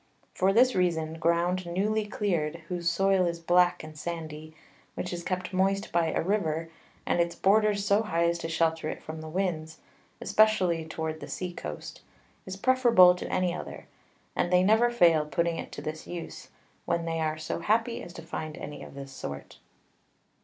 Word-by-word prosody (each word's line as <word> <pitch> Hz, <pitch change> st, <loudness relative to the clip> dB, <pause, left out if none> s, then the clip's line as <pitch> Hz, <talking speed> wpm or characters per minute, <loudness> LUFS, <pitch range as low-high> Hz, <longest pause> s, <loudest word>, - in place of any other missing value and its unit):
For 190 Hz, +1 st, +2 dB
this 250 Hz, +5 st, +5 dB
reason, 165 Hz, -3 st, 0 dB
Ground 175 Hz, +2 st, +1 dB
newly 210 Hz, +5 st, 0 dB
cleared, 170 Hz, -6 st, -2 dB
whose 175 Hz, -2 st, 0 dB
Soil 190 Hz, +1 st, +2 dB
is 170 Hz, 0 st, -3 dB
black 175 Hz, +1 st, +3 dB
and 155 Hz, 0 st, -10 dB
sandy, 155 Hz, -1 st, -6 dB, 0.4 s
which 180 Hz, -, -4 dB
is 175 Hz, -, -4 dB
kept 185 Hz, +1 st, -3 dB
moist 195 Hz, +2 st, +1 dB
by 170 Hz, -1 st, +2 dB
a -, -, 0 dB
River, 165 Hz, -4 st, -1 dB, 0.3 s
and -, -, +1 dB
its 170 Hz, 0 st, -1 dB
Borders 205 Hz, 0 st, +3 dB
so 205 Hz, +1 st, +3 dB
high 170 Hz, -6 st, 0 dB
as 170 Hz, 0 st, 0 dB
to 165 Hz, -, -4 dB
shelter 160 Hz, -1 st, 0 dB
it -, -, -6 dB
from 155 Hz, 0 st, -7 dB
the 160 Hz, -, -7 dB
Winds, 160 Hz, -3 st, -2 dB, 0.4 s
especially 185 Hz, -7 st, +3 dB
towards 160 Hz, 0 st, -4 dB
the -, -, -8 dB
Sea 180 Hz, -1 st, -4 dB
Coast, 75 Hz, -, -7 dB, 0.5 s
is 190 Hz, 0 st, -5 dB
preferable 235 Hz, -6 st, +6 dB
to 180 Hz, -, -6 dB
any 180 Hz, -1 st, +1 dB
other; -, -, -7 dB, 0.5 s
and 175 Hz, -, 0 dB
they 180 Hz, 0 st, +5 dB
never 220 Hz, +5 st, +4 dB
fail 170 Hz, -9 st, +4 dB
putting 170 Hz, +2 st, -1 dB
it -, -, -7 dB
to 145 Hz, -, -7 dB
this 155 Hz, 0 st, -6 dB
Use, 175 Hz, -2 st, -7 dB, 0.4 s
when 170 Hz, 0 st, 0 dB
they 165 Hz, 0 st, -2 dB
are 155 Hz, -1 st, -1 dB
so 155 Hz, +1 st, -4 dB
happy 225 Hz, +5 st, +1 dB
as -, -, -9 dB
to 165 Hz, -, -9 dB
find 155 Hz, -1 st, -6 dB
any 145 Hz, -, -7 dB
of -, -, -11 dB
this 135 Hz, -1 st, -8 dB
sort. 70 Hz, -, -8 dB
170 Hz, 180 wpm, -28 LUFS, 160-190 Hz, 0.5 s, preferable